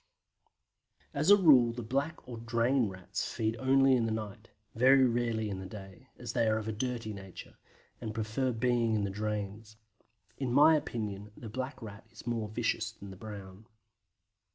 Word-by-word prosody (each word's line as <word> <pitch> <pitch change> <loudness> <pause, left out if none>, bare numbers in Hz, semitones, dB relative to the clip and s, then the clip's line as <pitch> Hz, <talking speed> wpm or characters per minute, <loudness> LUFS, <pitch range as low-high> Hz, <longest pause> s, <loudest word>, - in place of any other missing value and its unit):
As 150 +5 0
a 205 - +9
rule 130 -11 +6
the 120 0 -6
Black 140 +8 -2
or 120 -2 -7
Drain 115 +1 +1
Rats 95 -1 -5
feed 110 0 -1
only 135 +1 +4
in 115 -2 +1
the - - -1
night, 110 +1 -5 0.2
very 130 +3 +6
rarely 115 -2 0
in 100 -2 -4
the 95 - -7
day, 95 -3 -11
as - - -6
they 115 - +2
are 110 0 +2
of 110 0 -4
a - - -1
dirty 115 -1 -3
nature, 95 -2 -11 0.4
and 110 - -4
prefer 110 +4 -1
being 120 -1 +1
in 105 - 0
the 100 - -2
drains. 105 +1 -4 0.6
In 130 -3 -1
my 150 +5 +7
opinion 105 -7 -4
the 115 - -8
Black 130 +4 -5
Rat 105 0 -10
is 115 -1 -14
more 115 -3 -2
vicious 110 - -1
than 100 -1 -11
the - - -9
Brown. 100 0 -10
115 Hz, 175 wpm, -31 LUFS, 105-125 Hz, 0.6 s, a